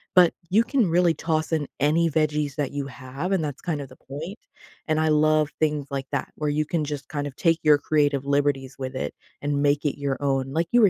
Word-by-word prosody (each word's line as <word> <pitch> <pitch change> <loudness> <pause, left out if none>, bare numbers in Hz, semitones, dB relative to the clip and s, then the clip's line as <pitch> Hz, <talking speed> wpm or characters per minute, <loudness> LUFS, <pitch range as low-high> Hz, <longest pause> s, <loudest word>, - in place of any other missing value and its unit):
but 180 -2 +7 0.2
you 215 +5 +4
can 240 -6 +1
really 170 0 +4
toss 160 -1 -1
in 155 -3 0
any 160 +4 +3
veggies 150 -2 0
that 145 -3 -1
you 140 -1 -3
have, 135 +7 -5
and 185 -5 +2
that's 145 -2 -4
kind 155 -4 -2
of 135 - -8
the - - -14
point, 160 - -7 0.5
and 155 0 +2
I 155 - +2
love 155 0 +3
things 150 -3 0
like 135 -1 -3
that 140 - -2
where 150 -1 -1
you 150 +1 +1
can 160 0 -1
just 145 -1 -5
kind 145 -1 -2
of 135 - -9
take 165 -1 +2
your 150 -1 +6
creative 145 -2 +1
liberties 140 -2 0
with 130 0 -4
it 75 - -3 0.3
and 145 -1 0
make 145 +1 +2
it 145 0 -1
your 140 -1 -1
own, 135 -1 0
like 165 +2 +1
you 240 0 +5
were 205 - +7
150 Hz, 235 wpm, -25 LUFS, 140-160 Hz, 0.5 s, but